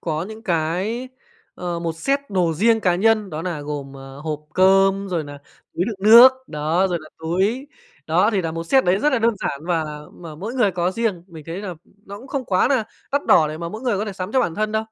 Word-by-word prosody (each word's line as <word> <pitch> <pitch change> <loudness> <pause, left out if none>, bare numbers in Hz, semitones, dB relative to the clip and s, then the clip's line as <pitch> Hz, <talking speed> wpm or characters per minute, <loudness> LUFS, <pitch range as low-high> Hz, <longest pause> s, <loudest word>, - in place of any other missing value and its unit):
có 155 -1 -2
những 220 0 -10
cái, 185 +9 -1 0.5
ờ, 175 -1 -4
một 170 -1 -2
set 275 +11 0
đồ 180 -4 +1
riêng 225 +6 +3
cá 180 -4 +2
nhân 215 +1 +2
đó 155 0 -5
nà 170 -4 -3
gồm, 145 -2 -6
à, - - -11 0.2
hộp 155 -1 -3
cơm, 195 +1 +4
rồi 170 -4 -2
nà 145 0 -9 0.4
túi 175 - 0
đựng 220 0 -4
nước, 240 +3 +10 0.2
đó, 155 +5 0
rồi 175 -2 -1
nà 155 -1 -13
túi. 190 - -1 0.4
Đó, 180 +7 +3
thì 200 -4 0
nà 165 -2 -3
một 165 0 -4
set 265 +10 +3
đấy 180 +2 +2
rất 295 +7 +1
là 260 - +2
đơn 230 0 +2
giản 140 - -3
và 170 -3 0 0.3
mà 165 -3 -10
mỗi 205 +10 -6
người 245 -6 +3
có 175 0 -1
riêng, 205 -4 -2
mình 160 -5 -12
thấy 165 +2 -5
là 185 -4 -5 0.3
nó 200 +1 -8
cũng 250 - -13
không 275 -1 -3
quá 185 -1 +2
nà 255 -5 +1 0.3
đắt 285 +1 0
đỏ 155 -3 +5
để 155 +1 -6
mà 170 0 -4
mỗi 215 +7 -8
người 240 -6 0
có 210 - -1
thể 210 - -5
sắm 185 +2 -6
cho 260 - +3
bản 170 - -1
thân 215 +3 -1
đâu. 220 0 0
185 Hz, 250 wpm, -21 LUFS, 165-220 Hz, 0.5 s, nước